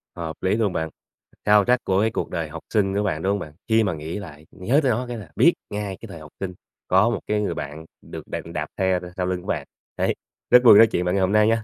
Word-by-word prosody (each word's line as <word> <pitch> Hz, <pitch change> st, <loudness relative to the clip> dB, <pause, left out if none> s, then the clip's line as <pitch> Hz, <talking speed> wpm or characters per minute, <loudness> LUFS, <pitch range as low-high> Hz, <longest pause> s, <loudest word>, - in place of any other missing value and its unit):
Hợp 80 Hz, -2 st, -5 dB
lý 95 Hz, +2 st, +2 dB
luôn 105 Hz, -5 st, +1 dB
bạn! 80 Hz, 0 st, -2 dB, 0.6 s
Soundtrack 105 Hz, +4 st, +4 dB
của 95 Hz, +1 st, +1 dB
cái 110 Hz, +1 st, +2 dB
cuộc -, -, -3 dB
đời 80 Hz, -3 st, -3 dB
học 85 Hz, +1 st, -8 dB
sinh 100 Hz, -3 st, +2 dB
của 105 Hz, -, +1 dB
bạn, 85 Hz, -6 st, -1 dB
đúng 95 Hz, -, +1 dB
hông 100 Hz, -, 0 dB
bạn? 75 Hz, -6 st, -8 dB
Khi 110 Hz, 0 st, +4 dB
mà 95 Hz, -4 st, 0 dB
nghĩ 80 Hz, +5 st, -5 dB
lại, 80 Hz, -6 st, -11 dB
nhớ 120 Hz, +10 st, +1 dB
tới 130 Hz, -, +3 dB
nó 125 Hz, +3 st, -1 dB
cái 120 Hz, -1 st, -5 dB
là 100 Hz, -9 st, -10 dB
biết -, -, +5 dB, 0.2 s
ngay 100 Hz, -2 st, -4 dB
cái 115 Hz, -, -8 dB
thời 85 Hz, -, -9 dB
học 75 Hz, -1 st, -12 dB
sinh, 95 Hz, -2 st, -4 dB, 0.3 s
có 95 Hz, +5 st, +4 dB
một 120 Hz, -, -1 dB
cái 105 Hz, 0 st, +1 dB
người 105 Hz, -, -1 dB
bạn 75 Hz, +3 st, -7 dB, 0.2 s
được -, -, -9 dB
đạp -, -, -4 dB
đạp 75 Hz, -1 st, -3 dB
xe 95 Hz, -2 st, +2 dB
thôi 90 Hz, -, -9 dB
sau 90 Hz, -, 0 dB
lưng 90 Hz, 0 st, -2 dB
của -, -, -14 dB
bạn. -, -, -2 dB, 0.3 s
Đấy, -, -, +1 dB, 0.3 s
rất 125 Hz, 0 st, +7 dB
vui 120 Hz, -, +9 dB
được -, -, +8 dB
nói 115 Hz, -, +8 dB
chuyện 90 Hz, -, -1 dB
với 90 Hz, -, +1 dB
bạn -, -, +1 dB
ngày 100 Hz, -, +2 dB
hôm 95 Hz, +1 st, +2 dB
nay 105 Hz, 0 st, +5 dB
nha! 115 Hz, 0 st, +1 dB
95 Hz, 295 wpm, -23 LUFS, 85-105 Hz, 0.6 s, vui